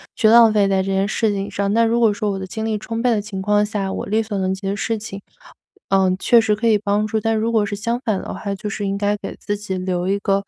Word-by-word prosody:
去 220 Hz, -, +3 dB
浪 230 Hz, 0 st, +7 dB
费 205 Hz, -2 st, +3 dB
在 190 Hz, -1 st, +1 dB
这 -, -, -6 dB
件 195 Hz, +1 st, +1 dB
事 220 Hz, +1 st, 0 dB
情 200 Hz, 0 st, -3 dB
上。 200 Hz, 0 st, -1 dB
那 230 Hz, +1 st, +4 dB
如 230 Hz, +1 st, +2 dB
果 225 Hz, -3 st, +4 dB
说 210 Hz, 0 st, -2 dB
我 195 Hz, -, -3 dB
的 190 Hz, -, -5 dB
精 220 Hz, +4 st, -5 dB
力 220 Hz, -1 st, -1 dB
充 225 Hz, +2 st, -5 dB
沛 250 Hz, -, +2 dB
的 215 Hz, -3 st, +1 dB
情 200 Hz, -2 st, -6 dB
况 205 Hz, +1 st, +2 dB
下， 205 Hz, -2 st, -3 dB
我 -, -, -4 dB
力 215 Hz, +3 st, +1 dB
所 215 Hz, -2 st, -4 dB
能 190 Hz, 0 st, 0 dB
及 190 Hz, +1 st, -6 dB
的 195 Hz, -, -1 dB
事 225 Hz, +2 st, -2 dB
情， 205 Hz, -2 st, -8 dB, 0.7 s
呃， 190 Hz, -1 st, +3 dB
确 235 Hz, -, +5 dB
实 220 Hz, -2 st, +2 dB
可 225 Hz, +3 st, -1 dB
以 220 Hz, -2 st, +4 dB
帮 205 Hz, +1 st, 0 dB
助。 220 Hz, +1 st, -1 dB
但 225 Hz, +1 st, 0 dB
如 220 Hz, +1 st, 0 dB
果 220 Hz, -2 st, +2 dB
是 205 Hz, -, -4 dB
相 235 Hz, +3 st, -2 dB
反 210 Hz, -4 st, 0 dB
的 -, -, -6 dB
话 200 Hz, -2 st, -4 dB
就 210 Hz, +2 st, -5 dB
是 205 Hz, 0 st, -4 dB
应 195 Hz, 0 st, -1 dB
该 205 Hz, +1 st, 0 dB
给 -, -, -7 dB
自 205 Hz, -, -3 dB
己 200 Hz, -2 st, -4 dB
留 180 Hz, -1 st, -2 dB
一 200 Hz, +1 st, 0 dB
个， 200 Hz, -1 st, 0 dB
205 Hz, 320 characters per minute, -20 LUFS, 195-220 Hz, 0.7 s, 浪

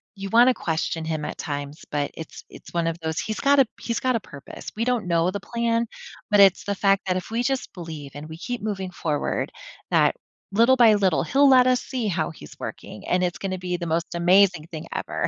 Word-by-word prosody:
you 195 Hz, 0 st, -6 dB
wanna 245 Hz, +2 st, +6 dB
question 160 Hz, 0 st, -2 dB
him 155 Hz, -1 st, -2 dB
at -, -, -5 dB
times, 145 Hz, 0 st, -5 dB
but 145 Hz, -1 st, -1 dB
it's 160 Hz, -, -9 dB
it's -, -, -14 dB
one 170 Hz, -1 st, 0 dB
of 165 Hz, -, -2 dB
those 160 Hz, -1 st, -2 dB
he's 215 Hz, 0 st, -3 dB
got 280 Hz, 0 st, +4 dB
a 265 Hz, -, +5 dB
he's 235 Hz, -, -2 dB
got 255 Hz, -2 st, +1 dB
a -, -, +1 dB
purpose. 140 Hz, -9 st, -10 dB
We 225 Hz, -, -1 dB
don't 245 Hz, -5 st, 0 dB
know 170 Hz, 0 st, +2 dB
the 200 Hz, +2 st, -3 dB
plan, 235 Hz, +2 st, 0 dB, 0.5 s
but 205 Hz, -, +5 dB
it's 195 Hz, -2 st, +6 dB
the 205 Hz, -, -1 dB
fact 195 Hz, -1 st, +2 dB
that 185 Hz, -1 st, 0 dB
if 185 Hz, -, -6 dB
we 230 Hz, +2 st, -1 dB
just 270 Hz, 0 st, -1 dB
believe 160 Hz, -6 st, -8 dB
and 150 Hz, +1 st, -7 dB
we 160 Hz, -, -8 dB
keep 235 Hz, +6 st, -5 dB
moving 195 Hz, -3 st, -3 dB
forward, 155 Hz, -4 st, -2 dB, 0.4 s
that -, -, +4 dB, 0.4 s
little 230 Hz, +6 st, +5 dB
by 230 Hz, -4 st, +6 dB
little, 190 Hz, -5 st, +2 dB
he'll 280 Hz, +1 st, +4 dB
let 255 Hz, -2 st, +6 dB
us 255 Hz, -1 st, +3 dB
see 245 Hz, -4 st, -3 dB
how 175 Hz, -3 st, -1 dB
he's 75 Hz, -, -13 dB
working, 105 Hz, -, -8 dB
and 180 Hz, 0 st, +2 dB
it's 175 Hz, -3 st, -1 dB
gonna 185 Hz, -2 st, -4 dB
be 180 Hz, -1 st, -2 dB
the 175 Hz, -, -5 dB
most 165 Hz, +1 st, -2 dB
amazing 180 Hz, -1 st, +4 dB
thing 155 Hz, -1 st, -7 dB
ever. -, -, -2 dB
185 Hz, 230 wpm, -24 LUFS, 165-230 Hz, 0.5 s, wanna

